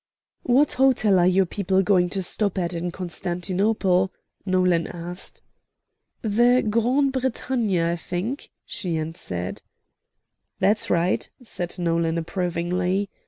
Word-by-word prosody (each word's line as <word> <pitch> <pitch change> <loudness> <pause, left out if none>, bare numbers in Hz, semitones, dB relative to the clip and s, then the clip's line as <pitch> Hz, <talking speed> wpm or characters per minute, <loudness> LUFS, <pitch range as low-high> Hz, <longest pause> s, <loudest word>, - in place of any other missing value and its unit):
"What 270 +4 +3
hotel 235 -7 +3
are 175 - +4
your 185 +1 +4
people 190 +1 0
going 180 -2 +3
to 190 +1 -2
stop 200 +2 0
at 175 -1 -1
in 175 +1 -2
Constantinople?" 185 +2 0 0.4
Nolan 180 -2 +2
asked. 175 +1 -8 0.8
"The 240 +4 +3
Grande 245 +6 +2
Bretagne, 250 -6 0
I 170 +1 +1
think," 185 - -4 0.2
she 175 -4 -3
answered. 100 - -5 1.0
"That's 210 +2 +2
right," 175 +1 +1
said 175 -6 -4
Nolan, 170 -1 0
approvingly. 180 +3 -1
185 Hz, 115 wpm, -24 LUFS, 175-215 Hz, 1.0 s, are